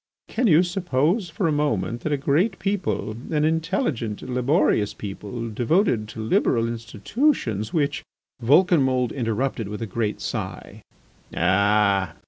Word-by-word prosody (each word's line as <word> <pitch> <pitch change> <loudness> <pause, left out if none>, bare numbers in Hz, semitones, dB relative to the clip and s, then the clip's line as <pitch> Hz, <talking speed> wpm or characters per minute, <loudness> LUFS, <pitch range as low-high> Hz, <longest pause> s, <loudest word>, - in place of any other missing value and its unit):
Can 245 +1 0
you 170 -1 +6
suppose 175 - 0
for 170 +2 -1
a - - +1
moment 130 -6 -1
that 155 - -2
a 145 - +2
great 155 +9 +1
people, 195 - -2 0.2
an 150 -2 +1
intelligent, 160 - -1
laborious 125 - +1
people, 105 +3 -6
devoted 120 - +1
to 110 +1 -7
liberal 115 +1 +2
institutions 115 - -1
which.. 145 -2 0 0.2
." - - -36
Vulcanmould 130 -4 +3
interrupted 115 -1 -2
with 105 +3 -5
a - - -2
great 105 +1 -2
sigh: - - -5 0.6
"Ah! 100 0 +2
125 Hz, 130 wpm, -23 LUFS, 110-165 Hz, 0.6 s, you